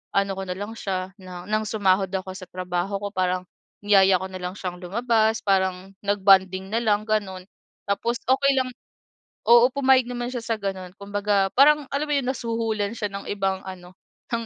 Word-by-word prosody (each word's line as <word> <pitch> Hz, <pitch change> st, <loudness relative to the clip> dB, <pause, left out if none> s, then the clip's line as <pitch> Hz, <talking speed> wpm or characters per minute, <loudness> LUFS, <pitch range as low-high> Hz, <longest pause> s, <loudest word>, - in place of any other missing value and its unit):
ano 200 Hz, 0 st, +2 dB
ko 195 Hz, -, -3 dB
nalang 200 Hz, +4 st, -5 dB
siya 185 Hz, -1 st, -3 dB
na 180 Hz, -1 st, -9 dB
ng 215 Hz, +1 st, 0 dB
sumahod 195 Hz, -3 st, +2 dB
ako 190 Hz, -1 st, -3 dB
sa 185 Hz, -2 st, -9 dB
trabaho 180 Hz, +2 st, -3 dB
ko -, -, -1 dB
parang 185 Hz, -2 st, 0 dB, 0.4 s
niyaya 195 Hz, -2 st, +5 dB
ko 190 Hz, -, -4 dB
na 185 Hz, -, -7 dB
lang 180 Hz, +2 st, -4 dB
siyang 180 Hz, -2 st, -5 dB
lumabas, 220 Hz, +3 st, +1 dB
parang 190 Hz, -1 st, 0 dB
nag-bonding 190 Hz, -1 st, +3 dB
nalang 220 Hz, -2 st, +1 dB
gano'n. 200 Hz, -4 st, -1 dB, 0.5 s
Tapos 235 Hz, +4 st, 0 dB
okey 270 Hz, +2 st, +4 dB
lang 255 Hz, -1 st, -1 dB, 0.8 s
oo, 240 Hz, +1 st, +8 dB
pumayag 265 Hz, -2 st, +4 dB
naman 245 Hz, 0 st, -3 dB
siya 245 Hz, -, -3 dB
sa 225 Hz, -1 st, 0 dB
ganun. 190 Hz, -2 st, -4 dB
Kumbaga 200 Hz, -1 st, 0 dB
parang 295 Hz, +2 st, +6 dB
alam 285 Hz, +2 st, -1 dB
mo 295 Hz, -, +1 dB
yung 265 Hz, -3 st, 0 dB
nasuhulan 225 Hz, -4 st, -2 dB
siya 210 Hz, -, -2 dB
ng 200 Hz, 0 st, -7 dB
ibang 195 Hz, -2 st, -1 dB
ano, 180 Hz, -1 st, -9 dB, 0.4 s
ng 230 Hz, -, 0 dB
200 Hz, 175 wpm, -24 LUFS, 190-230 Hz, 0.8 s, oo